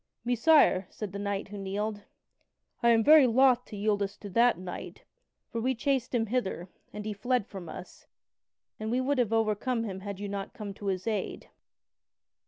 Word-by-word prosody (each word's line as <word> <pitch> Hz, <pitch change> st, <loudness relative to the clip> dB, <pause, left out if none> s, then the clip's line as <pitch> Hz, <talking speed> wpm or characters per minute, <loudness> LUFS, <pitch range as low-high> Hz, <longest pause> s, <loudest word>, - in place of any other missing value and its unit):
"Messire," 245 Hz, -, +4 dB
said 210 Hz, -3 st, -6 dB
the 200 Hz, -, -6 dB
knight 200 Hz, 0 st, -3 dB
who 205 Hz, 0 st, -7 dB
kneeled: 205 Hz, +2 st, -3 dB, 0.8 s
"I 235 Hz, -, +4 dB
am 225 Hz, -1 st, +5 dB
very 300 Hz, -1 st, +8 dB
loth 250 Hz, +1 st, +4 dB
to 210 Hz, -, -9 dB
yield 205 Hz, 0 st, +1 dB
us 200 Hz, 0 st, -3 dB
to 205 Hz, -, -9 dB
that 235 Hz, 0 st, +4 dB
knight, 180 Hz, 0 st, -8 dB, 0.5 s
for 230 Hz, -, -2 dB
we 260 Hz, +2 st, +1 dB
chased 255 Hz, 0 st, 0 dB
him 225 Hz, -2 st, +2 dB
hither, 200 Hz, -6 st, -2 dB, 0.2 s
and 210 Hz, 0 st, -7 dB
he 215 Hz, -, -2 dB
fled 245 Hz, +2 st, 0 dB
from 190 Hz, -6 st, -9 dB
us, 180 Hz, -, -10 dB, 0.7 s
and 215 Hz, 0 st, -3 dB
we 245 Hz, +3 st, +1 dB
would 265 Hz, +1 st, 0 dB
have 235 Hz, -3 st, +1 dB
overcome 225 Hz, +2 st, +1 dB
him 190 Hz, -4 st, -5 dB
had 200 Hz, 0 st, -6 dB
you 205 Hz, -, -4 dB
not 200 Hz, -1 st, -5 dB
come 205 Hz, -2 st, -6 dB
to 200 Hz, +1 st, -8 dB
his 185 Hz, -1 st, -1 dB
aid." 215 Hz, -4 st, -3 dB
215 Hz, 190 wpm, -29 LUFS, 200-245 Hz, 0.8 s, very